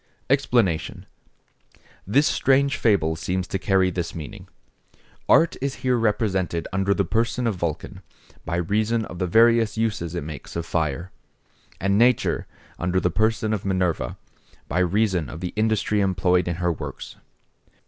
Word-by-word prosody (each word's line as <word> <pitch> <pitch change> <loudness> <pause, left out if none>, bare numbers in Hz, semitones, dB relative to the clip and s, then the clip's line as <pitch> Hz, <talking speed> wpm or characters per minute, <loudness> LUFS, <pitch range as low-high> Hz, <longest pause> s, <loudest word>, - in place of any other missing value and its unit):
EXPLANATION.—This 120 - -2
strange 140 0 +2
fable 85 -8 +2
seems 90 +3 -2
to 95 - -3
carry 95 -1 +2
this 85 -1 -4
meaning. 80 -3 -8 0.8
Art 165 - +5
is 140 0 -2
here 125 -1 +3
represented 105 -7 0
under 95 +1 +1
the 100 - +1
person 115 +7 0
of 115 - +1
Vulcan, 90 +2 -4 0.4
by 85 - -3
reason 110 +6 0
of 90 - -9
the 90 - 0
various 115 +2 +4
uses 100 -7 -1
it 85 - -3
makes 75 -3 -8
of 85 -1 -3
fire; 80 +2 -2 0.7
and 100 +2 +1
nature, 125 0 +2 0.3
under 90 +2 +1
the 90 - 0
person 110 +3 +1
of 105 - -2
Minerva, 95 -3 -1 0.5
by - - -1
reason 90 -2 +1
of 80 - -8
the 90 0 -5
industry 110 -1 +1
employed 90 -2 +2
in 85 - -1
her 85 +1 0
works. 80 - -7
95 Hz, 145 wpm, -23 LUFS, 85-110 Hz, 0.8 s, Art